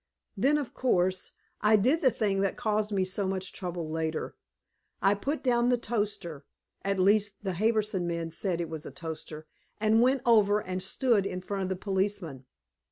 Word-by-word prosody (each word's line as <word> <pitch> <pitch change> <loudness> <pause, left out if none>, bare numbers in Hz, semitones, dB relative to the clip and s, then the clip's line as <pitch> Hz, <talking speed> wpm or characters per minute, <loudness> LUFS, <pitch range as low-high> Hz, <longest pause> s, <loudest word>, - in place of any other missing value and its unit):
Then, 270 +9 +3
of 285 -5 -4
course, 185 -7 +1 0.3
I 210 +1 +5
did 255 +10 +3
the 260 - +5
thing 200 -5 0
that 195 -1 0
caused 215 -3 0
me 190 -2 +1
so 190 +1 -2
much 190 0 -3
trouble 175 -3 -4
later. 160 0 -3 0.6
I 195 - +4
put 280 +10 -3
down 240 -2 +3
the 245 - +3
toaster 205 -10 -3 0.4
at 195 0 -1
least 200 +1 +2
the 190 -2 -1
Harbison 215 -2 +1
man 170 -1 -3
said 175 +1 -2
it 170 - -2
was 160 -1 -7
a - - -5
toaster 160 -2 -7 0.3
and 220 +1 +4
went 255 +1 +3
over 210 -3 +5
and 185 -2 -4
stood 205 +1 +1
in 180 - -4
front 195 +2 -4
of 190 - -2
the 190 - -1
policeman. 190 -8 -2
195 Hz, 180 wpm, -29 LUFS, 180-220 Hz, 0.6 s, I